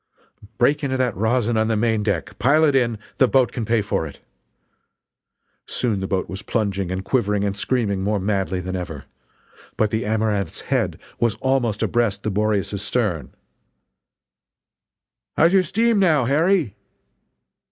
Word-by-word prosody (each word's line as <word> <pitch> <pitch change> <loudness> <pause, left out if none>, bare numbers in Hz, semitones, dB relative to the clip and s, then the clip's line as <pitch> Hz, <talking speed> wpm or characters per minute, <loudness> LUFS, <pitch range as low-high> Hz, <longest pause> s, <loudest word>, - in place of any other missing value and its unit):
"Break 145 +5 +2
into 130 -1 0
that 125 -4 0
rosin 115 +2 +1
on 110 0 +2
the 110 - +1
main 110 0 +1
deck 105 0 -2
pile 140 +9 +4
it 145 -3 +3
in, 120 -4 +2 0.2
the 130 - +6
boat 130 -1 +3
can 115 - -4
pay 115 -1 +1
for 80 -5 -1
it!" 70 - -12 1.5
Soon 115 -6 -1
the 95 - -3
boat 95 -1 -1
was 95 +1 -6
plunging 100 -4 -1
and 95 +1 -4
quivering 105 -5 +1
and 100 -1 -1
screaming 105 -3 -1
more 105 +1 0
madly 95 -2 -1
than 95 +1 -4
ever. 80 -6 -6 0.7
But 110 -1 +1
the 110 +1 -1
Amaranth's 105 -4 -1
head - - -1 0.2
was 115 -2 +1
almost 125 -5 0
abreast 110 -4 0
the 110 - -1
Boreas's 105 -1 0
stern: 105 -6 -2 2.0
"How's 170 +3 +5
your 190 - +6
steam, 220 +5 +1
now, 155 -9 +3
Harry?" 155 - +2
110 Hz, 150 wpm, -22 LUFS, 100-130 Hz, 2.0 s, the